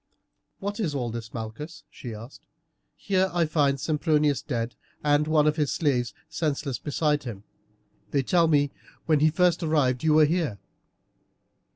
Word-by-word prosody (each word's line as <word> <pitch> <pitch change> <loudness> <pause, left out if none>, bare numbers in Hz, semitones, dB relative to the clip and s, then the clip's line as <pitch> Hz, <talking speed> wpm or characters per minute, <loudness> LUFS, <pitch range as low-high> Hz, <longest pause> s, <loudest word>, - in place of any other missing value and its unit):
"What 205 +2 -4
is 165 -9 -1
all 120 -4 -2
this, 115 -1 -6
Malchus," 115 +8 -7
she 120 - -8
asked. 115 +4 -10 0.5
"Here 190 -1 +1
I 175 -1 +2
find 145 -3 +1
Sempronius 150 -1 +1
dead 120 -4 -3 0.3
and 145 0 +3
one 155 -1 +3
of 150 +1 +2
his 150 -3 +1
slaves 125 -6 0
senseless 145 -5 -2
beside 150 -1 0
him; 105 -5 -7 0.7
they 140 -2 +1
tell 170 +4 +3
me 145 -3 +3 0.3
when 155 -2 +3
he 155 +2 +5
first 175 +1 +2
arrived 145 -6 +1
you 155 -1 +4
were 155 -1 +7
here." 155 - 0
150 Hz, 155 wpm, -26 LUFS, 130-160 Hz, 0.7 s, were